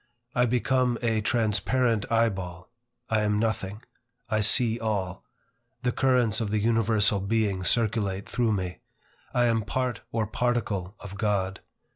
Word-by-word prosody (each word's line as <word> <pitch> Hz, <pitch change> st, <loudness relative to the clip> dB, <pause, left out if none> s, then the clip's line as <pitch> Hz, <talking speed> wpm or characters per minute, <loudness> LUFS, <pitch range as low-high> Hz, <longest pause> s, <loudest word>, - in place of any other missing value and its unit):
I 125 Hz, 0 st, +3 dB
become 125 Hz, 0 st, +1 dB
a 110 Hz, -2 st, +1 dB
transparent 115 Hz, +1 st, +1 dB
eye 115 Hz, 0 st, +4 dB
ball; 90 Hz, 0 st, -7 dB, 0.4 s
I 110 Hz, -1 st, +1 dB
am 105 Hz, 0 st, +1 dB
nothing; 110 Hz, -1 st, -2 dB, 0.5 s
I 110 Hz, 0 st, +2 dB
see 115 Hz, +2 st, +4 dB
all; 100 Hz, -4 st, -2 dB, 0.6 s
the 125 Hz, -, +2 dB
currents 120 Hz, -4 st, +2 dB
of 110 Hz, -, -1 dB
the 105 Hz, -, 0 dB
Universal 110 Hz, -2 st, +2 dB
Being 100 Hz, -1 st, 0 dB
circulate 100 Hz, -2 st, 0 dB
through 115 Hz, -3 st, +1 dB
me; 90 Hz, -3 st, -3 dB, 0.5 s
I 120 Hz, 0 st, +2 dB
am 115 Hz, -1 st, +2 dB
part 125 Hz, +4 st, -2 dB
or 115 Hz, -1 st, 0 dB
particle 110 Hz, -4 st, -1 dB
of 100 Hz, 0 st, -9 dB
God. 95 Hz, -3 st, 0 dB
110 Hz, 140 wpm, -27 LUFS, 100-120 Hz, 0.6 s, eye